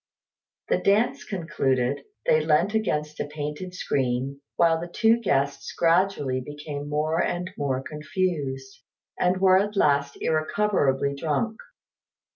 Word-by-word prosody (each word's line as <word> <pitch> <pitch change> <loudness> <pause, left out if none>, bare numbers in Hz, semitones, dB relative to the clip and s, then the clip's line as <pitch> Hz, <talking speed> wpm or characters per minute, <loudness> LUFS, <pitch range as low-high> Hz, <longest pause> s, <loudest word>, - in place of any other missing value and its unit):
The - - +2
dance 210 +4 +2
concluded, 140 -7 -1 0.2
they 155 0 +4
leant 165 +6 +2
against 150 -9 -1
a - - -2
painted 150 +5 -5
screen, 135 -2 -1
while 165 -1 +3
the 175 - -5
two 225 +6 +3
guests 140 -8 0
gradually 165 -7 +2
became 145 0 -6
more 155 +3 +1
and 180 +1 -2
more 135 -2 -1
confused, 150 -4 -3 0.4
and 180 +1 +2
were 185 0 +5
at 205 +1 -2
last 140 -5 +2
irrecoverably 155 -4 +1
drunk. 160 +10 -2
150 Hz, 120 wpm, -25 LUFS, 140-185 Hz, 0.4 s, were